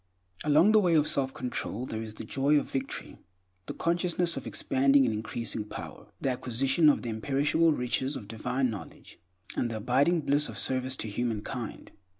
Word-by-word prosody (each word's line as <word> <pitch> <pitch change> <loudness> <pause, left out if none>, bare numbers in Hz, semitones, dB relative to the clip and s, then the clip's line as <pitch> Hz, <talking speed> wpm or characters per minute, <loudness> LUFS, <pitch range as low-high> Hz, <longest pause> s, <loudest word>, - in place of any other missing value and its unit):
Along 155 +7 +5
the 215 - +6
way 175 -5 +3
of 150 -1 +4
self 135 -1 +2
control 125 -2 -4
there 110 -3 -4
is 110 -1 -7
the - - -7
joy 140 +3 +2
of 145 - -2
victory; 135 0 -4 0.5
the - - -5
consciousness 170 0 0
of 135 - -6
expanding 135 +1 +3
and 115 - 0
increasing 110 +1 -3
power; 105 - -9
the 135 - 0
acquisition 130 +5 +2
of 145 - +2
the 120 - -3
imperishable 145 +8 +2
riches 130 +1 -1
of 105 - -7
divine 125 +3 -1
knowledge; 95 -8 -10 0.4
and 120 - 0
the 115 - -4
abiding 140 +10 +2
bliss 145 +1 +1
of 110 - -7
service 130 +4 0
to 110 - -3
humankind. 115 +1 -4
130 Hz, 175 wpm, -29 LUFS, 115-145 Hz, 0.5 s, the